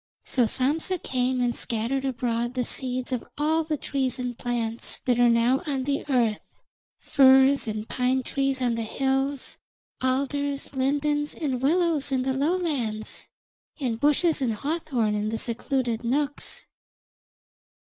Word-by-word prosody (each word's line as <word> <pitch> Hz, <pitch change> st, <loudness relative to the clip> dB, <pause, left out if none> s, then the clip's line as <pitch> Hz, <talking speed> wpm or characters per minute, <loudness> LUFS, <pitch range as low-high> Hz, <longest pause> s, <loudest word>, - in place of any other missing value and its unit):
So 250 Hz, -2 st, +2 dB
Sampsa 300 Hz, -, 0 dB
came 255 Hz, -4 st, -1 dB
and 240 Hz, -1 st, +1 dB
scattered 240 Hz, +4 st, -1 dB
abroad 240 Hz, -1 st, -1 dB
the 250 Hz, -, +1 dB
seeds 255 Hz, 0 st, -1 dB
of 250 Hz, -3 st, -1 dB
all 315 Hz, +2 st, +2 dB
the 310 Hz, -1 st, -2 dB
trees 265 Hz, -2 st, -1 dB
and 250 Hz, -1 st, -3 dB
plants 235 Hz, -1 st, -2 dB
that 245 Hz, -2 st, +2 dB
are 240 Hz, 0 st, +6 dB
now 235 Hz, +3 st, +3 dB
on 270 Hz, -3 st, -1 dB
the 280 Hz, +1 st, -1 dB
earth, 235 Hz, -5 st, +2 dB, 0.6 s
firs 270 Hz, -1 st, +5 dB
and 215 Hz, 0 st, -4 dB
pine 255 Hz, +1 st, 0 dB
trees 270 Hz, 0 st, -1 dB
on 240 Hz, -1 st, +2 dB
the 230 Hz, -, -2 dB
hills, 270 Hz, +4 st, -1 dB, 0.4 s
alders, 280 Hz, +2 st, -1 dB
lindens, 290 Hz, +2 st, 0 dB
and 265 Hz, -6 st, -2 dB
willows 315 Hz, -1 st, +2 dB
in 260 Hz, -1 st, +1 dB
the 265 Hz, 0 st, 0 dB
lowlands, 275 Hz, -8 st, -2 dB, 0.5 s
and 240 Hz, -5 st, -2 dB
bushes 300 Hz, +2 st, +3 dB
and 235 Hz, -4 st, 0 dB
hawthorn 275 Hz, -5 st, -1 dB
in 210 Hz, 0 st, -1 dB
the 225 Hz, -, -2 dB
secluded 240 Hz, 0 st, -1 dB
nooks. 285 Hz, +4 st, -2 dB
260 Hz, 140 wpm, -26 LUFS, 240-285 Hz, 0.6 s, are